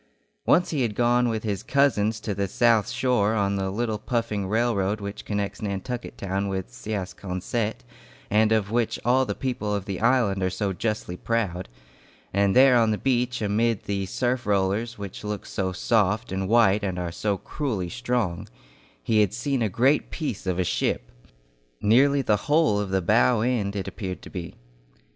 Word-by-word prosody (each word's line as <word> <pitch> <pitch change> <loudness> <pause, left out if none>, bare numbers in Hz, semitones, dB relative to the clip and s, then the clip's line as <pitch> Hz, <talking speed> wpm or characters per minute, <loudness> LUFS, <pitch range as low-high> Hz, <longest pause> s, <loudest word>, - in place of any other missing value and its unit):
Once 175 +1 +4
he 150 -4 0
had 115 -4 -1
gone 120 +1 +3
with 110 -1 -2
his 100 -4 -2
cousins 115 -6 +2
to 105 -1 -3
the 100 0 -1
South 115 +2 +3
Shore 115 -4 +1
on 100 -2 +1
the 95 -1 -1
little 110 +1 -2
puffing 110 -4 -2
railroad 110 -2 +1
which 100 0 -7
connects 100 -1 -3
Nantucket 110 +4 -4
town 100 0 -2
with 95 -9 -4
Siasconsett, 100 - -4 0.4
and 110 +1 +3
of 110 -2 +1
which 120 -1 0
all 130 +2 +4
the - - -2
people 115 -6 -2
of 100 -2 -3
the 95 -3 -4
island 115 -5 +2
are 95 - +1
so 95 +2 -2
justly 105 -2 -3
proud; 95 -6 -2 0.6
and 100 0 +2
there 130 -1 +7
on 115 -1 +3
the 105 - +1
beach, 125 -2 0
amid 110 +1 +1
the 100 -1 -2
surf 125 +4 -1
rollers 100 +4 0
which 100 -1 -7
look 105 -1 -4
so 95 -1 -2
soft 105 +1 +1
and 95 0 -2
white 110 -3 +4
and 95 -2 -2
are 90 -1 -3
so 100 +3 -1
cruelly 110 -7 -3
strong, 120 -4 -2 0.5
he 110 - +3
had 105 0 +1
seen 135 +1 -1
a 110 - +1
great 130 +9 +2
piece 140 - -4
of 90 -1 0
a 90 - +2
ship. - - -1 0.7
Nearly 135 +6 +4
the 105 -3 +2
whole 150 -8 +3
of 100 -2 -2
the 95 -1 0
bow 110 +4 +3
end 110 -4 0
it 100 - -3
appeared 95 -4 -6
to - - -11
be. 85 -2 -6
105 Hz, 180 wpm, -25 LUFS, 95-120 Hz, 0.7 s, there